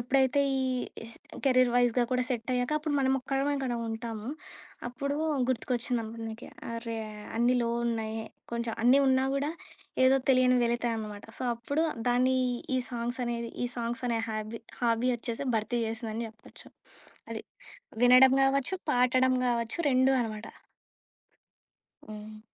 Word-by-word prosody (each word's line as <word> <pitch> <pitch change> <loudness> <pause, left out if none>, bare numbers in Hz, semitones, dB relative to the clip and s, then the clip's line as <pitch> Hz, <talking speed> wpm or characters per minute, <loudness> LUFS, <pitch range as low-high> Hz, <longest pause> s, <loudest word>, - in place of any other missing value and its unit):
ఎప్పుడైతే 265 +3 +2 0.2
ఈ - - +1 0.4
is 230 +1 -7 0.3
career 255 -2 +4
వైజ్‌గా 245 0 +3
కూడా 250 0 +2
సెట్టయ్యాక, 245 +1 -1
అప్పుడు 305 -1 -2
మనమొక్కరమే 270 +1 +1
ఇక్కడ 265 -3 -2
ఉంటాము. 225 0 -5 0.6
అప్పుడూ 280 +3 -3 0.3
గుర్తుకొచ్చిందమ్మను 235 -2 -2
నాకే. 220 +2 -8 0.2
'అరే, 230 0 -4 0.4
అన్నీ 240 +2 +3
లో 235 - 0 0.2
ఉన్నాయే. 225 -1 -2 0.3
కొంచెం 235 -1 -2
అన్నీ 255 +3 +7
ఉన్నా 260 0 +3
గూడా 280 +2 0 0.5
ఏదో 260 +1 +6
తెలియని 255 -1 +5
వెలితే 240 +1 0
అనమాట. 210 -2 -6
సో, - - -5
అప్పుడు 285 +7 -1 0.2
దాన్నీ 255 +2 +3 0.4
ఈ - - +3
సాంగ్సనేది, 235 -1 -3
ఈ - - +1
సాంగ్సనే 235 0 -1
హాబీ, 215 +1 -4 0.2
హాబీ 235 +1 +2
ఒచ్చేసి 235 +3 -4
భర్తీ 220 +3 -1
జేసిందని 225 0 -3
జెప్పచ్చు 220 +1 -15 0.6
అది. - - -4 0.6
వినడం 255 +1 +8
గావచ్చు 275 +5 +2 0.2
పాడటం 255 +1 +3
గావచ్చు. 235 +3 0
రెండూ 260 +1 +4
అనమాట. 215 -2 -4 1.6
హ్మ్. 215 0 -9
245 Hz, 125 wpm, -29 LUFS, 230-260 Hz, 1.6 s, వినడం